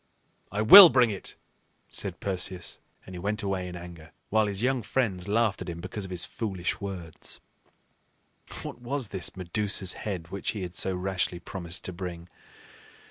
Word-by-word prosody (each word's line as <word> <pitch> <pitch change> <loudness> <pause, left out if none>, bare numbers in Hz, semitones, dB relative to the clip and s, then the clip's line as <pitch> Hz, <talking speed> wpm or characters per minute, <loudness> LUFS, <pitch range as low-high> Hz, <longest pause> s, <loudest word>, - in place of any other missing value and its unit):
"I 105 +2 -1
will 180 - +12
bring 125 -5 +3
it," 100 - -7 0.6
said - - -5
Perseus; 95 -2 -1 0.3
and 95 - -11
he 90 - -6
went 105 +4 -2
away 95 -2 -2
in 90 - -7
anger, 85 -2 -11 0.2
while 110 0 +3
his 100 +2 -3
young 130 0 +1
friends 100 -6 -1
laughed 105 -1 +1
at 90 - -5
him 85 -1 -6
because 100 +3 -6
of - - -9
his 90 -2 -2
foolish 95 -7 -4
words. 90 -5 -8 1.2
What 120 - -8
was 125 -2 -3
this 95 -1 -1
Medusa's 95 +1 0
head 90 -6 -5
which 100 +4 -3
he 105 -4 -5
had 90 -1 -6
so 95 +1 0
rashly 90 -1 -2
promised 90 0 -5
to 90 - -5
bring? 85 -1 -7
95 Hz, 170 wpm, -27 LUFS, 90-105 Hz, 1.2 s, will